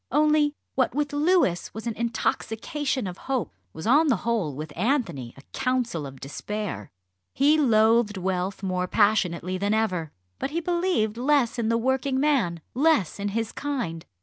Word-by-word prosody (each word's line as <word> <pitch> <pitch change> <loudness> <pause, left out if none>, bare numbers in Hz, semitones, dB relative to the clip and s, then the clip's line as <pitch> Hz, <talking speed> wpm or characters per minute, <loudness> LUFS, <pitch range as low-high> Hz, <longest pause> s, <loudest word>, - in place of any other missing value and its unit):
Only 300 0 +3 0.2
what 260 -2 +1
with 290 0 -1
Louis 295 - +2
was 220 - -6
an 230 - -1
intoxication 235 +3 -2
of 180 -1 -6
hope, 260 -3 -1 0.2
was 160 - -8
on 290 +8 +5
the 265 - +4
whole 210 - 0
with 150 +1 -7
Anthony 190 - -1
a 135 - -14
counsel 250 - -1
of 135 -1 -11
despair. 200 - -5 0.5
He 290 +3 +5
loathed 225 -4 +4
wealth 185 +1 -2
more 185 -1 -1
passionately 185 -3 +1
than 205 +2 +1
ever; 180 -8 -1 0.3
but - - -2
he 325 +4 -1
believed 340 - 0
less 255 -2 +2
in 225 -1 0
the 230 - +3
working 265 +2 0
man, 245 - +1
less 265 - +2
in 200 - -2
his 225 +2 -2
kind. 240 - -3
225 Hz, 160 wpm, -25 LUFS, 185-275 Hz, 0.5 s, on